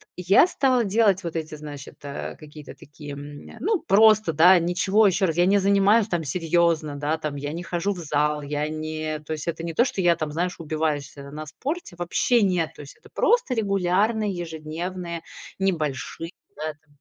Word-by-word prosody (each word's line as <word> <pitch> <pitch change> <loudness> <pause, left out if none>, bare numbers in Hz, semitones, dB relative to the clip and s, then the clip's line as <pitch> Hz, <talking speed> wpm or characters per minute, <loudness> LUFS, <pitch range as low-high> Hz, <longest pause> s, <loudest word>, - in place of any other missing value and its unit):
я 180 - +5
стала 255 -7 +2
делать 200 -2 +2
вот 170 -1 -5
эти, 155 -1 -4
значит, 145 -2 -9
э, 140 0 -5
какие-то 150 -1 -12
такие, 145 0 -10
м, 145 +1 -9
ну, 415 -1 +1
просто, 215 -3 +5
да, 175 +4 +6
ничего, 190 +5 +3
ещё 190 +1 +2
раз, 165 -2 -1
я 175 +1 +4
не 200 +1 +4
занимаюсь 200 +3 +4
там 175 -4 -1
серьёзно, 165 -1 +1
да, 150 +2 -1
там, 150 -2 -4
я 145 +2 -4
не 175 +1 -5
хожу 180 +4 -1
в - - -11
зал, 150 -2 0
я 150 +1 -2
не 155 0 -4
то 160 - -3
есть 155 +2 -6
это 165 0 -3
не 165 -1 -4
то, 240 - +3
что 195 - -2
я 170 -1 +4
там, 155 -2 -4
знаешь, 180 +3 -2
убиваюсь, 155 -3 -2
э, 140 0 -9
на 155 +1 -7
спорте, 295 - -5
вообще 210 +6 +2
нет. 180 -4 0
То - - -10
есть 140 - -12
это - - -19
просто 480 - +2
регулярные 200 +1 +1
ежедневные 170 +1 -5 0.4
небольшие, 165 -2 -2 0.3
да, 155 - -4
там. 150 0 -35
170 Hz, 190 wpm, -24 LUFS, 155-195 Hz, 0.4 s, да